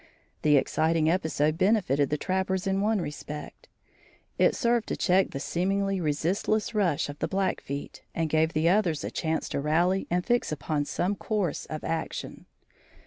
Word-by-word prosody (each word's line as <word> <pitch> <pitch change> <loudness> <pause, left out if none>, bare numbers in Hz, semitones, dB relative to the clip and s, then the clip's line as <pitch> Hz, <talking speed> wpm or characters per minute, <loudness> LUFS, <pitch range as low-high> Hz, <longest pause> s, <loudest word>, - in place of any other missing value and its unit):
The 150 -1 +5
exciting 160 +3 +2
episode 160 -3 0
benefited 185 - +2
the 150 - 0
trappers 190 +2 -1
in 195 0 +1
one 210 -1 +1
respect: 150 -1 -7 0.7
it - - +4
served 235 -2 +1
to - - -2
check 190 0 +3
the 135 - -5
seemingly 195 +4 0
resistless 185 +9 0
rush 185 -9 +1
of 145 0 -8
the - - 0
Blackfeet 185 -7 -3
and 165 -1 0
gave 160 +1 +2
the 155 +2 +2
others 175 -5 +2
a - - -4
chance 160 -1 -1
to - - -2
rally 175 +6 +1
and 175 +1 0
fix 240 -7 +1
upon 150 0 -1
some 180 +6 -1
course 200 -6 -2
of 155 -1 -6
action. 165 0 -4
170 Hz, 160 wpm, -27 LUFS, 155-195 Hz, 0.7 s, The